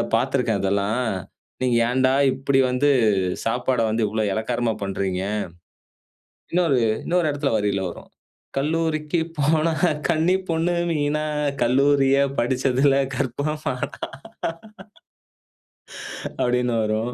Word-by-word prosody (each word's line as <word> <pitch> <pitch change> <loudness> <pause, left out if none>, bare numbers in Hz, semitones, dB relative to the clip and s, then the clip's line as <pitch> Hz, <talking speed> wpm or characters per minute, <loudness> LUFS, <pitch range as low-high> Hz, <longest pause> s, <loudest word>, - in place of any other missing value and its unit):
பாத்திருக்கேன், 125 -4 +1
அதெல்லாம். 100 +5 0 0.6
நீங்க 125 -2 +2
ஏன்டா, 130 +1 +2 0.2
இப்டி 135 +1 +1
வந்து 125 +3 +2 0.6
சாப்பாட 125 +2 0
வந்து, 110 +1 0
இவ்ளோ 110 0 -1
எளக்காரமா 115 +1 -1
பண்றீங்க" 95 -1 -2 1.3
இன்னொரு 165 -7 +3 0.2
இன்னொரு 175 -2 +1
எடத்ல, 145 -2 -1
வரியில 100 -2 0
வரும். 85 - -10 0.5
"கல்லூரிக்கு 155 +2 0 0.2
போனா, 155 +3 +2 0.4
கன்னி 170 +3 +3
பொண்ணு 165 +2 +1 0.2
மீனா, 150 0 0 0.4
கல்லூரியில 135 +2 +3 0.2
படுச்சதுல, 130 +2 +2 0.2
கற்பம்மானா" 140 0 -3 2.4
அப்டினு 125 -1 +1
வரும். 110 +3 -1
130 Hz, 90 wpm, -23 LUFS, 115-150 Hz, 2.4 s, இன்னொரு